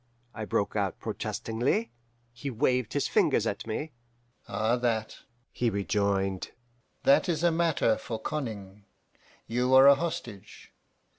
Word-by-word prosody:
I 110 0 -5
broke 100 - -1
out 100 -3 -1
protestingly. 125 - -2 0.4
"He 130 +4 -5
waved 125 -1 0
his 145 - 0
fingers - - +2
at - - -3
me. 145 +8 -3 0.6
'Ah, 110 +2 +1
that,' 115 -3 -1 0.3
he 120 - 0
rejoined 100 -2 -1 0.5
'that 275 -8 +4
is 165 -1 0
a 170 - +4
matter 160 -9 +2
for 115 -2 -5
conning. 105 -9 -5 0.6
You 125 +3 +1
are 130 +1 +9
a 140 - +10
hostage. 135 - -6
120 Hz, 130 wpm, -28 LUFS, 105-140 Hz, 0.6 s, a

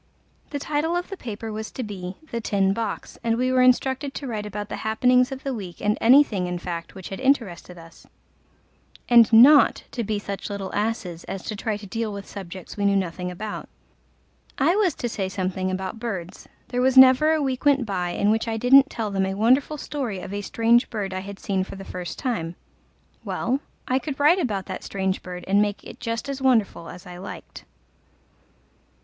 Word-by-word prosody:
The 290 - -3
title 305 +4 -1
of 350 0 -2
the - - -3
paper 225 - -6
was 215 0 -5
to 255 - -4
be 190 -4 -6 0.2
The 235 - -2
Tin 195 -3 +1
Box, 220 -1 -5
and 230 0 +1
we 255 +1 +1
were 255 0 +4
instructed 260 +2 +2
to 280 - -5
write 215 -4 -4
about 205 0 -5
the - - -5
happenings 250 +4 +2
of 265 0 -6
the 275 - -2
week 190 -7 -7
and 210 +1 +1
anything 230 -7 +5
in 180 0 -3
fact 170 -1 -6
which 190 -2 -8
had 195 - -6
interested 230 -10 0
us, 165 0 -15 1.0
and 235 -2 +7
not 265 +6 +7
to 235 - -3
be 215 0 -1
such 200 0 -5
little 200 -2 -5
asses 205 -5 -2
as 195 -1 -6
to 215 - -4
try 210 +1 -2
to 210 - -11
deal 225 +2 -3
with 200 -1 -7
subjects 185 -2 -8
we 205 - -1
knew 200 0 +3
nothing 180 -1 -2
about. 205 +4 -6 0.9
I 315 +7 +3
was 390 -7 +2
to 240 - -3
say 200 -5 -3
something 185 0 -2
about 190 +3 -4
birds: 195 -7 -6 0.2
there 245 0 -1
was 260 +1 +3
never 260 +4 +8
a 315 - +1
week 260 -2 -2
went 280 -4 +3
by 185 -4 -2
in 205 +4 +1
which 225 +2 0
I 225 -1 -1
didn't 270 +4 +6
tell 220 -3 -3
them 195 -1 0
a 190 - -3
wonderful 255 +8 +3
story 260 -9 -4
of 185 - -7
a 205 - -2
strange 230 +4 +2
bird 200 -4 -3
I 185 - -2
had 200 +1 -8
seen 190 -2 -1
for 190 - -9
the 195 0 -9
first 180 -2 -6
time: 175 -10 -3 0.7
well, 260 +3 -1 0.3
I 255 +1 +2
could 270 +2 -6
write 310 +6 +5
about 205 - -1
that 190 - -6
strange 190 -1 -2
bird 180 -1 -8
and 200 +2 +4
make 205 -1 -1
it - - -11
just 230 +1 -3
as 275 -1 -4
wonderful 225 -10 +1
as 180 +1 -11
I 180 -1 -9
liked. 185 - -9
215 Hz, 205 wpm, -24 LUFS, 190-255 Hz, 1.0 s, never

